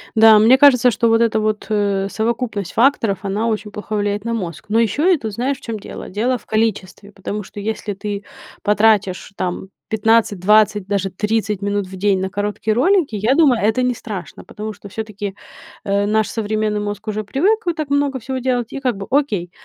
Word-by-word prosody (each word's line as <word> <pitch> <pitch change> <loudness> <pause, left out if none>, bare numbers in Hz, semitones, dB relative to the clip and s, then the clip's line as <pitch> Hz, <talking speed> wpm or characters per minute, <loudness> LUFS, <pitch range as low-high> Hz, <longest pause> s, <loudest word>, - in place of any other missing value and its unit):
Да, 220 -1 +7
мне 230 +5 +6
кажется, 255 -3 +6
что 230 +1 +1
вот 225 0 +3
эта 225 -1 +2
вот, 215 0 -2
э, 200 -2 0
совокупность 220 -3 -2
факторов, 230 -5 +2
она 205 +3 -1
очень 215 -2 -2
плохо 210 +1 -5
влияет 205 0 -1
на 230 - -1
мозг. 180 -8 -5
Но 220 +2 +2
еще 290 - +3
это, 250 -10 -2
знаешь, 250 +6 -2
в - - -22
чём 230 -2 -5
дело? - - -9
Дело 240 +6 0
в - - -20
количестве, 210 -2 -2
потому 205 +1 -5
что 205 - -10
если 210 0 -3
ты 200 +1 -5 0.4
потратишь, 210 -3 +2
там, 185 +1 -4 0.2
15-20, 215 -2 +3
даже 195 -1 -1
30 210 +1 -1
минут 205 -1 -1
в 190 - -9
день 195 0 +2
на 190 - -2
короткие 205 +2 -2
ролики, 325 - +2
я 215 +5 +2
думаю, 275 -6 +4
это 220 +4 +2
не 250 -1 +1
страшно, 205 -6 -8
потому 215 +1 -7
что 205 - -12
всё-таки, 205 -1 -5 0.5
э, 200 0 +1
наш 215 +1 +1
современный 215 -1 -1
мозг 205 +1 -5
уже 215 0 -2
привык, 375 - +1
вы 345 - +1
так 310 -3 -4
много 285 -1 0
всего 260 +3 -4
делать, 245 -2 -1
и - - -4
как 250 -4 0
бы 195 - -7
окей. 230 -11 0
215 Hz, 195 wpm, -19 LUFS, 205-235 Hz, 0.5 s, Да